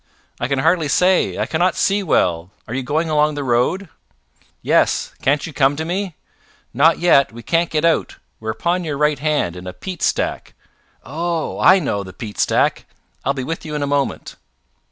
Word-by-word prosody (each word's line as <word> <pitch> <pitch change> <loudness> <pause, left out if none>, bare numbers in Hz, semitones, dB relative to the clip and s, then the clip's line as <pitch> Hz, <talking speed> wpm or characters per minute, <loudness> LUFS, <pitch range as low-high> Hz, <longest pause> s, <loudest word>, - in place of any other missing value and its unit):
"I 120 - -1
can 140 +1 -1
hardly 160 +3 +2
say. 180 +6 +2
I - - 0
cannot 175 +3 +1
see 205 +1 +1
well. 90 - +1 0.2
Are 115 - -6
you 130 - -1
going 150 +6 -1
along 150 -1 +2
the 145 - -3
road?" 130 +10 0 0.8
"Yes. - - +1
Can't 140 +2 +1
you 165 - -8
come 135 +1 +2
to 160 +2 -4
me?" 180 0 -3 0.6
"Not 155 +7 +4
yet. 170 -6 +4
We 115 +1 -11
can't 170 +4 +1
get 155 +1 0
out. 165 -1 +1 0.2
We're 110 - -5
upon 170 +12 -1
your 150 -4 -3
right 150 -1 +1
hand, 145 - 0
in 90 +1 -9
a 90 - -6
peat 185 -3 -7
stack." - - -1 0.5
"Oh! 165 +4 -3
I 185 - +7
know 130 - -1
the 95 -1 -11
peat 105 -3 -8
stack. - - +1 0.4
I'll 140 +2 0
be 130 - -3
with 165 +5 -4
you 150 -1 -5
in 145 - -1
a - - +1
moment." 140 -1 -2
150 Hz, 195 wpm, -19 LUFS, 130-170 Hz, 0.8 s, I